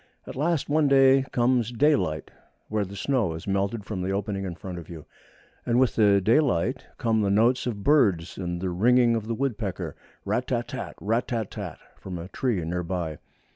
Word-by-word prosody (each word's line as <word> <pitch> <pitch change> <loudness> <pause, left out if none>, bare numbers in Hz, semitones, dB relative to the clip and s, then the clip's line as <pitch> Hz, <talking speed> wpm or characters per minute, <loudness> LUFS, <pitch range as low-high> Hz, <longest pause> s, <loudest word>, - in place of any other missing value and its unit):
At - - -8
last 155 +2 0
one 150 0 +3
day 135 -1 +5
comes 120 -1 +2
daylight, 120 - +1 0.4
where 105 -1 0
the 95 +1 -9
snow 115 -4 0
has 80 - -8
melted 100 +2 -1
from 100 -4 -4
the 90 - -2
opening 100 0 -2
in 90 -2 -5
front 90 0 -7
of 85 - -12
you, 80 -3 -9 0.6
and 120 +1 +1
with 130 -2 +3
the 100 -3 +4
daylight 120 - +1
come 115 -3 +1
the 100 - +1
notes 115 +6 +3
of 105 -5 -4
birds 100 - +3
and 90 -2 -4
the 95 -1 -1
ringing 120 +6 +4
of 110 -1 -3
the 115 - -1
woodpecker 110 -7 -3 0.3
rat - - -1
tat - - -2
tat - - -4
tat! - - -12
rat 115 +4 0
tat 115 -4 -3
tat - - -6
tat! - - -32 0.2
from 95 -2 -6
a 85 +2 -7
tree 105 -7 -1
near 90 +2 -2
by. 85 -3 -4
105 Hz, 205 wpm, -26 LUFS, 95-125 Hz, 0.6 s, day